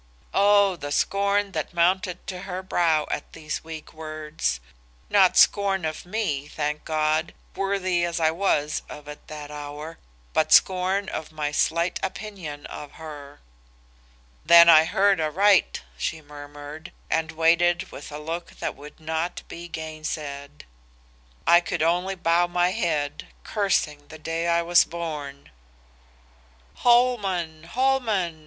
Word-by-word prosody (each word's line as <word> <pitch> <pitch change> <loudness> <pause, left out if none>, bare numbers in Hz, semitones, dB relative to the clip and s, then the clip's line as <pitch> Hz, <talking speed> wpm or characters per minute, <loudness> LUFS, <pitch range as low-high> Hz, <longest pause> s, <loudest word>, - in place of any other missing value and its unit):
"O 200 -1 +4
the 145 -3 -6
scorn 200 +4 +1
that 185 - -4
mounted 180 +1 +1
to 185 -1 -6
her 185 +1 -4
brow 165 -4 +2
at - - -4
these 155 -2 -5
weak 160 -1 -9
words. 155 - -3 0.5
Not 190 -3 +5
scorn 195 -4 +4
of 155 +2 -5
me, 180 -9 -2
thank 150 0 -3
God, 155 +1 0 0.2
worthy 190 -3 0
as 170 0 -1
I 160 -1 +3
was 160 -4 0
of 150 0 -10
it 150 0 -10
that 150 -1 -8
hour, 150 +2 -8 0.3
but 155 0 +1
scorn 190 +3 +4
of 155 -4 -5
my 150 -1 -3
slight 170 +4 +1
opinion 185 -7 -6
of 145 - -9
her. 145 -3 -10 1.0
"'Then 170 0 +8
I 160 -1 +8
heard 195 +1 +2
aright,' 190 +6 +3 0.2
she 160 - -2
murmured, 145 +1 -10 0.2
and 160 0 -1
waited 170 +2 +2
with 145 - -9
a 150 - -6
look 165 +3 -6
that - - -3
would 150 +3 -13
not 160 +2 -3
be 170 +1 -8
gainsaid. 155 -3 -6 0.8
"I 170 - +7
could 175 -2 -2
only 180 +4 +1
bow 175 0 +2
my 175 +1 +1
head, 155 -7 -2 0.2
cursing 155 -8 -1
the 160 - -11
day 165 +2 -3
I 170 0 +2
was 175 0 +5
born. 150 - -6 1.3
"'Holman! 195 -10 +2
Holman! 220 -7 0
165 Hz, 135 wpm, -25 LUFS, 150-185 Hz, 1.3 s, Then